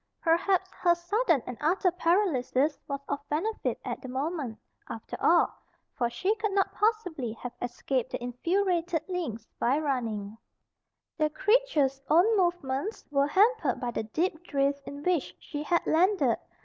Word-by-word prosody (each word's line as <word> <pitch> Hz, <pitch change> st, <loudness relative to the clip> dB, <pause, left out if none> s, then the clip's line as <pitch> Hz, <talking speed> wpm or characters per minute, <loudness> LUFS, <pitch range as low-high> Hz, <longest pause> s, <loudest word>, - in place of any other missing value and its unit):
Perhaps 370 Hz, +3 st, +2 dB
her 345 Hz, -1 st, +2 dB
sudden 345 Hz, -, +1 dB
and 250 Hz, -, -7 dB
utter 360 Hz, +4 st, +2 dB
paralysis 325 Hz, -6 st, +1 dB
was 280 Hz, -1 st, -3 dB
of -, -, -2 dB
benefit 385 Hz, +9 st, -1 dB
at -, -, -4 dB
the 260 Hz, -, -8 dB
moment, 265 Hz, -2 st, -3 dB, 0.3 s
after 225 Hz, -, -6 dB
all; 340 Hz, +1 st, +4 dB, 0.4 s
for 240 Hz, -, 0 dB
she 370 Hz, -, 0 dB
could 425 Hz, -2 st, -1 dB
not 390 Hz, -1 st, +1 dB
possibly 360 Hz, -, 0 dB
have 240 Hz, +2 st, -7 dB
escaped 245 Hz, +1 st, -2 dB
the -, -, -5 dB
infuriated 340 Hz, +5 st, 0 dB
lynx 335 Hz, -, -4 dB
by 255 Hz, +4 st, +2 dB
running. 225 Hz, -8 st, -2 dB, 0.8 s
The 305 Hz, 0 st, +3 dB
creature's 305 Hz, -, +2 dB
own 365 Hz, +8 st, +5 dB
movements 345 Hz, -1 st, -1 dB
were 280 Hz, 0 st, +3 dB
hampered 380 Hz, -, +3 dB
by 245 Hz, -1 st, -2 dB
the -, -, -2 dB
deep 320 Hz, -, -2 dB
drift 280 Hz, -3 st, 0 dB
in 285 Hz, 0 st, -7 dB
which 355 Hz, -4 st, 0 dB
she 295 Hz, -2 st, -6 dB
had 340 Hz, +3 st, +1 dB
landed. 370 Hz, +5 st, +3 dB
315 Hz, 150 wpm, -28 LUFS, 260-370 Hz, 0.8 s, own